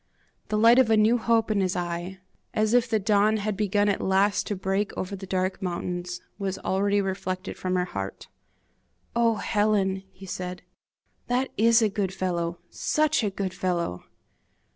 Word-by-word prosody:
The 215 - -1
light 230 +3 +6
of 255 -3 +4
a 220 - +5
new 220 +3 +4
hope 225 -1 +2
in 205 -2 +2
his 185 -1 0
eye, 175 +1 -3 0.4
as 215 +1 +2
if 245 -1 +3
the 220 - +2
dawn 210 +1 +3
had 210 0 -2
begun 205 0 +1
at 200 - +1
last 195 +2 +2
to 205 - -1
break 195 +2 -1
over 190 +2 -3
the 195 0 -9
dark 185 0 -1
mountains, 180 0 -3 0.2
was 195 -1 -2
already 200 +2 +1
reflected 190 -1 -3
from 185 0 -2
her 180 0 +1
heart. 100 - -6 0.9
"Oh! 230 -1 +3
Helen," 205 -3 +1
he 195 - -12
said, 180 -1 -5 0.6
"that 250 +2 0
IS 230 +1 +5
a - - +4
good 195 -2 -2
fellow, 175 -2 -2
SUCH 310 -3 +1
a 210 - +1
good 195 -1 -4
fellow!" 175 - -2
195 Hz, 170 wpm, -26 LUFS, 185-215 Hz, 0.9 s, light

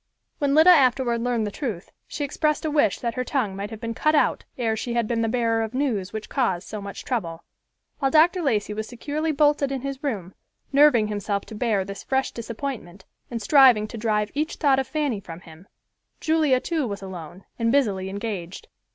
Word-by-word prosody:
When 280 -1 +1
Lida 320 +4 +8
afterward 255 -6 +3
learned 240 -2 0
the 205 - -3
truth, 215 - -5 0.2
she 290 - -4
expressed 305 +2 0
a 310 - 0
wish 290 -9 +2
that 235 -1 -2
her 255 - -2
tongue 245 -8 -1
might 200 +1 -5
have 220 -1 -8
been 230 0 -4
cut 305 +6 +2
out - - +2
ere 225 -3 0
she 235 +2 -4
had 235 -2 +1
been 230 0 0
the 225 - 0
bearer 230 -1 +1
of 225 +2 -4
news 225 -9 -1
which 220 -1 -6
caused 195 -10 -1
so 210 -1 -6
much 200 0 -8
trouble. 170 -10 -3 0.6
While 270 - +2
Dr. 335 +5 +4
Lacey 215 -8 0
was 215 +1 -4
securely 295 +7 -3
bolted 290 -1 +2
in 270 -2 -3
his 275 +1 -5
room, 195 -10 -3 0.4
nerving 270 -7 +5
himself 205 -1 -2
to - - -11
bear 210 -3 0
this 200 0 -7
fresh 265 0 -1
disappointment 230 -6 -6 0.2
and 235 - -4
striving 250 -4 +6
to 230 - -7
drive 210 -1 0
each 305 +3 -2
thought 275 -4 +3
of 265 - -2
Fanny 290 -9 -1
from 170 -3 -10
him, 165 +3 -15 0.5
Julia 310 -5 +2
too 315 -2 -2
was 200 -2 -6
alone 180 -1 -9 0.2
and 230 0 +2
busily 200 -9 +1
engaged. 200 - -6
235 Hz, 205 wpm, -24 LUFS, 205-280 Hz, 0.6 s, Lida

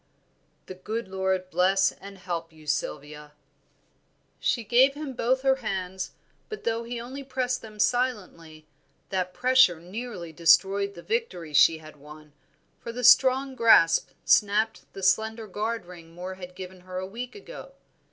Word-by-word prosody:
"The - - -8
good 215 +5 -5
Lord 190 -1 -2
bless 190 +2 +3
and 195 0 -12
help 170 -2 -5
you, 155 -1 -17
Sylvia." 150 0 -4 1.1
She 235 - 0
gave 255 +6 +4
him 290 -2 -6
both 255 +2 0
her 265 -1 +3
hands, 190 -5 -4 0.4
but 430 - -7
though 230 0 -1
he 235 0 -5
only 260 +4 -7
pressed 255 -1 -2
them 215 -1 -12
silently, 200 -10 -2 0.4
that 185 -1 -2
pressure 255 -9 +4
nearly 185 -2 -7
destroyed 195 +4 +3
the 170 - -11
victory 185 -9 -3
she 160 +3 +6
had 155 -1 -14
won, 150 +1 -14 0.5
for 235 - -7
the 250 +2 -6
strong 265 +2 +5
grasp 225 -9 +5 0.2
snapped 210 +2 +2
the 195 - -9
slender 220 +3 +1
guard 215 +1 -3
ring 170 -2 -13
Moor 180 +2 -6
had 180 -1 -10
given 185 0 -9
her 185 0 -8
a 185 - -3
week 235 +6 -7
ago. - - -11
195 Hz, 150 wpm, -26 LUFS, 175-240 Hz, 1.1 s, she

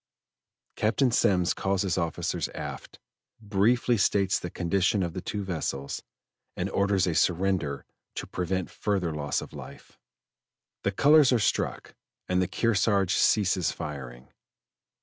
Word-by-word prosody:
Captain 120 +4 +2
Semmes 90 -5 +2
calls 95 0 -1
his 95 -3 0
officers 85 -3 -2
aft, - - -7 0.4
briefly 115 +4 +2
states 95 -1 +2
the 90 - -5
condition 95 +3 +1
of 85 -2 -3
the 95 - -5
two 105 +2 -4
vessels, 75 -7 -3 0.6
and - - -2
orders 100 -1 +2
a 90 - 0
surrender 90 -4 0 0.3
to - - -4
prevent 90 0 -2
a - - -19
further 95 -6 -1
loss 75 -1 -2
of - - -10
life. - - -12 0.8
The 100 - 0
colors 145 +6 +5
are 125 - +4
struck 110 - -1 0.3
and 90 0 +1
the 90 - +1
Kearsarge 100 -1 +1
ceases 95 -5 +2
firing. 65 -4 -7
95 Hz, 135 wpm, -27 LUFS, 85-100 Hz, 0.8 s, colors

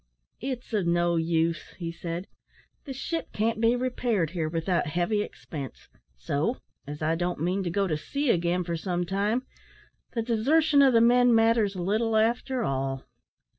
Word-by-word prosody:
"It's 250 -1 -5
of 200 -5 +1
no 175 0 +2
use," 165 0 0
he 170 -2 -4
said, 170 +2 -5 0.6
"the 280 - -6
ship 325 +5 -4
can't 220 +1 0
be 230 +1 +4
repaired 245 - 0
here 165 -3 -2
without 165 0 0
heavy 175 +7 0
expense; 145 -9 -8 0.3
so, 145 - -1 0.3
as 150 +1 -6
I 160 +1 +2
don't 175 0 -2
mean 180 +5 0
to 180 - -2
go 195 +3 +1
to 165 -5 0
sea 280 - -1
again 175 +1 +1
for 170 -1 -3
some 175 +1 -2
time, 205 +7 0 0.7
the 230 - -1
desertion 285 +7 +3
of 270 -2 +6
the 230 - +5
men 245 0 +5
matters 225 -3 +3
little 215 +5 +1
after 240 +3 +1
all." 135 -4 -2
195 Hz, 165 wpm, -27 LUFS, 170-235 Hz, 0.7 s, of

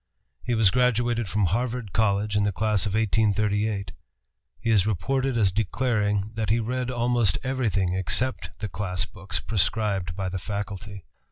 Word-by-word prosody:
He 120 - -1
was 110 -4 +5
graduated 120 -2 +1
from 105 +1 +1
Harvard 115 +2 -2
College 105 -1 +1
in 105 - +3
the 100 - +1
class 105 0 0
of 100 - -2
1838. 105 -2 +1 0.7
He 115 +1 0
is 105 -2 +4
reported 130 +6 0
as 100 -4 +3
declaring 105 0 0
that 110 -2 -2
he 115 +2 +3
read 125 +2 -2
almost 120 -5 +2
everything 115 -9 0
except 95 0 0
the 105 - -1
class 90 -1 -2
books 95 -1 -4
prescribed 95 -2 0
by 95 -1 -2
the 95 0 -3
faculty. 100 0 -6
105 Hz, 155 wpm, -25 LUFS, 95-115 Hz, 0.7 s, was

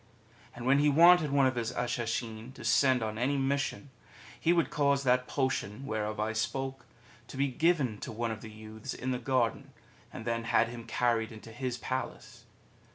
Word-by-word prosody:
And 120 - -7
when 135 +2 +4
he 150 +1 +4
wanted 170 +1 +6
one 140 -1 +3
of 130 - +2
his 120 -1 -2
Ashishin 120 -1 -3
to - - -9
send 125 +2 +4
on 110 0 -3
any 140 +4 +1
mission, 140 0 -1 0.5
he 165 - +2
would 170 -2 +2
cause 140 -1 +2
that 125 -1 +2
potion 130 -3 -2
where 110 -4 -2
of 105 0 -5
I 110 +1 0
spoke 130 +4 -3 0.4
to - - -9
be 140 +1 +1
given 135 -6 +1
to - - -6
one 115 +1 -2
of 110 -1 -6
the 110 - -9
youths 110 +4 -8
in 130 +1 -3
the 125 - -1
garden, 125 -2 0 0.4
and 110 - -8
then 115 -1 -1
had 115 0 +3
him 115 -1 -9
carried 115 -1 +1
into 110 +1 -11
his 125 +1 -3
Palace. 130 +1 -5
125 Hz, 190 wpm, -30 LUFS, 115-135 Hz, 0.5 s, wanted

